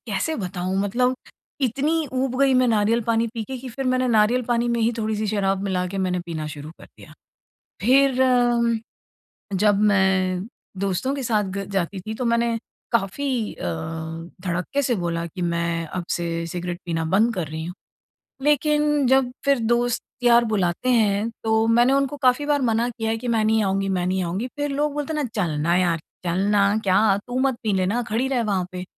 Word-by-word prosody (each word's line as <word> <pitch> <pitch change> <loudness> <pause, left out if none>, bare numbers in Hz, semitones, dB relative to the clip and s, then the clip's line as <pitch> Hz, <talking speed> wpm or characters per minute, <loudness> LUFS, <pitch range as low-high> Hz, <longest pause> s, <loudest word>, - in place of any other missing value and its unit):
कैसे 230 +10 -1
बताऊँ? 185 -2 -3
मतलब 250 +5 +1 0.4
इतनी 290 +6 0
ऊब 255 0 -1
गई 270 -1 +4
मैं 255 0 +4
नारियल 220 +1 +2
पानी 230 +1 +1
पीके 230 +4 -4
कि 255 +1 -8
फिर 265 +3 -5
मैंने 255 0 +1
नारियल 230 +3 +3
पानी 240 0 +1
में 235 -1 0
ही 230 +2 +2
थोड़ी-सी 215 -1 -1
शराब 195 -2 0
मिला 180 -2 -1
के 195 - -3
मैंने 180 -1 0
पीना 160 -2 -4
शुरू 150 0 -8
कर - - -11
दिया। - - -14 0.7
फिर 260 +3 +4
अम, 240 -2 +3 0.8
जब 205 +1 +3
मैं 190 -1 +2 0.3
दोस्तों 200 +8 -1
के 275 - -4
साथ 215 -3 +1
ग 195 - -2
जाती 190 0 -1
थी 220 - -3
तो 250 - -4
मैंने 235 0 +1 0.4
काफ़ी 235 +2 -1
अ, - - -8 0.8
धड़क्के 180 +10 -1
से 250 -2 +1
बोला 170 -1 -2
कि 175 +2 -7
मैं 170 -1 -1
अब 180 -2 -3
से 170 -1 -2
सिगरेट 175 +1 -4
पीना 165 -1 -1
बंद 215 +8 +2
कर 175 -4 -2
रही 160 +1 -5
हूँ। 180 +1 -6 0.7
लेकिन 295 -1 +2
जब 265 -1 +3
फिर 280 -2 +3
दोस्त-यार 240 0 +2
बुलाते 200 0 -1
हैं 215 -1 +2
तो 220 0 +2
मैंने 240 +3 +4
उनको 275 +1 +1
काफ़ी 255 +3 +3
बार 290 -2 +1
मना 230 0 +1
किया 225 -1 -3
है 225 - 0
कि 245 +1 -5
"मैं 225 -2 +2
नहीं 220 0 +3
आऊँगी, 195 0 0
मैं 180 -2 0
नहीं 185 0 0
आऊँगी।" 190 +8 -2
फिर 290 0 -2
लोग 290 +1 0
बोलते 295 +1 -3
हैं 300 - 0
ना - - -2
"चल 185 -6 0
ना 170 +3 +2
यार! 175 -2 +2 0.3
चल 175 +1 0
ना, 200 0 +3
क्या 195 +1 +4
तू 245 +1 -3
मत 265 -2 +1
पी 215 -2 0
लेना 195 +6 +1
खड़ी 235 +5 0
रह 250 -3 +1
वहाँ 190 -4 0
पे।" 180 0 -5
220 Hz, 195 wpm, -23 LUFS, 185-250 Hz, 0.8 s, गई